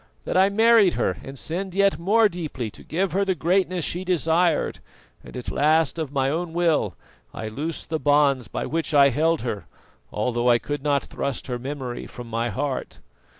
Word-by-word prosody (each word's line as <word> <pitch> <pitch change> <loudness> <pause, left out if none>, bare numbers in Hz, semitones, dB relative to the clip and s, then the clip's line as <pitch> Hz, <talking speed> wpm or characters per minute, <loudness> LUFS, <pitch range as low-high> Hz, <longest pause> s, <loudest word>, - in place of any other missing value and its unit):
That - - -3
I 190 +1 +5
married 220 -2 +5
her - - -1
and 135 +1 -9
sinned 180 +6 -4
yet 200 0 +3
more 215 +6 +4
deeply 155 - -5
to - - -13
give 185 +4 -1
her 195 +3 +1
the 190 -2 0
greatness 180 +1 +1
she 175 +2 -3
desired; 170 -1 +1 0.4
and - - -10
at 125 - -5
last, 155 +2 +2
of 155 -4 -3
my 135 -2 +1
own 165 +3 -2
will, 170 -2 +1 0.4
I 110 - -5
loosed 150 +8 -5
the 160 -1 -1
bonds 145 -4 +3
by - - -4
which 160 -1 -2
I 140 -1 +7
held 160 +5 +1
her, 110 -5 -4 0.4
although 120 +2 0
I 120 - +6
could 145 +4 -4
not 140 -1 +1
thrust 140 -4 -4
her 125 -2 -4
memory 130 -2 -5
from 120 -1 -10
my 115 +1 -1
heart. 130 +5 -3
155 Hz, 190 wpm, -24 LUFS, 130-180 Hz, 0.4 s, I